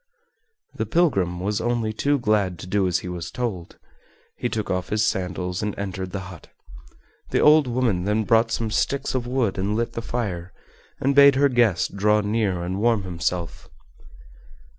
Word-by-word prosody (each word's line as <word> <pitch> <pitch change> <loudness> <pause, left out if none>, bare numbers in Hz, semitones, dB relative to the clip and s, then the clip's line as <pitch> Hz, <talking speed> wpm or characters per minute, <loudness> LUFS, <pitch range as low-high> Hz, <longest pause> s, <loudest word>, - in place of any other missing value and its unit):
The - - -3
pilgrim 100 - +1
was 100 +3 -1
only 120 -2 -1
too 145 +6 +1
glad 105 -7 0
to 85 - -9
do 95 +1 +1
as 90 - +1
he - - -5
was 90 -2 -5
told. 105 -9 -5 0.6
He 120 - -2
took 110 -3 -3
off 90 0 -2
his 105 +1 +1
sandals 90 -2 -2
and 105 -1 -3
entered 95 -2 -4
the 95 +1 -5
hut. 85 - -13 0.8
The - - +1
old 150 -2 +6
woman 115 -7 0
then 105 +2 +1
brought 115 +1 +3
some 115 -1 -2
sticks 140 +5 -1
of 125 -2 -2
wood 120 -7 0
and 100 +2 -1
lit 115 +1 -2
the 115 - -4
fire, 95 -8 -4 0.5
and 140 +1 +1
bade 140 0 +7
her 140 +1 +4
guest 115 -7 +1
draw 105 +1 +3
near 105 -4 -1
and 90 +2 -3
warm 115 -2 +2
himself. 85 -1 -4
105 Hz, 175 wpm, -23 LUFS, 90-120 Hz, 0.8 s, bade